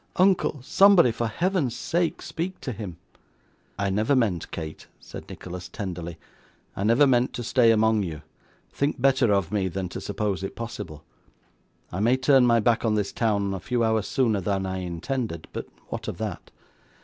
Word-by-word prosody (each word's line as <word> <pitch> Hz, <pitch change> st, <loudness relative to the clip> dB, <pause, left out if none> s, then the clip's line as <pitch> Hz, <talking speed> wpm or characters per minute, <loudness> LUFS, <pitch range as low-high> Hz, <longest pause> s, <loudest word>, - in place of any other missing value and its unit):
Uncle, 185 Hz, -5 st, +3 dB
somebody, 195 Hz, -4 st, +6 dB
for 115 Hz, +1 st, -2 dB
Heaven's 165 Hz, -, 0 dB
sake 170 Hz, +6 st, -1 dB
speak 180 Hz, +3 st, -4 dB
to 130 Hz, -, -4 dB
him.' 100 Hz, -7 st, -7 dB, 0.8 s
'I 100 Hz, -1 st, 0 dB
never 110 Hz, +8 st, +2 dB
meant, 105 Hz, -10 st, 0 dB
Kate,' 80 Hz, -2 st, -7 dB
said -, -, -10 dB
Nicholas, 90 Hz, 0 st, -8 dB
tenderly, 85 Hz, -4 st, -5 dB, 0.6 s
'I 100 Hz, -, -2 dB
never 120 Hz, +7 st, +5 dB
meant 125 Hz, -2 st, +2 dB
to 120 Hz, -, -4 dB
stay 120 Hz, 0 st, +4 dB
among 110 Hz, -1 st, +4 dB
you; 80 Hz, -5 st, -5 dB, 0.5 s
think 140 Hz, -1 st, -1 dB
better 130 Hz, -3 st, +3 dB
of 100 Hz, -3 st, +1 dB
me 100 Hz, -3 st, 0 dB
than 95 Hz, 0 st, -3 dB
to -, -, -6 dB
suppose 100 Hz, -1 st, -2 dB
it 95 Hz, -, -5 dB
possible. 85 Hz, -10 st, -7 dB, 0.9 s
I 90 Hz, -, -4 dB
may 120 Hz, +5 st, +3 dB
turn 130 Hz, -1 st, +5 dB
my 115 Hz, -1 st, +5 dB
back 115 Hz, +1 st, +2 dB
on 110 Hz, -2 st, +2 dB
this 105 Hz, -2 st, -1 dB
town 100 Hz, -4 st, 0 dB
a 95 Hz, -, -3 dB
few 120 Hz, +4 st, -1 dB
hours 110 Hz, -2 st, +1 dB
sooner 115 Hz, -7 st, +1 dB
than 95 Hz, 0 st, -1 dB
I 95 Hz, 0 st, -3 dB
intended, 90 Hz, +1 st, -4 dB
but -, -, -5 dB, 0.2 s
what -, -, -5 dB
of -, -, -4 dB
that? -, -, -5 dB
110 Hz, 175 wpm, -25 LUFS, 95-125 Hz, 0.9 s, somebody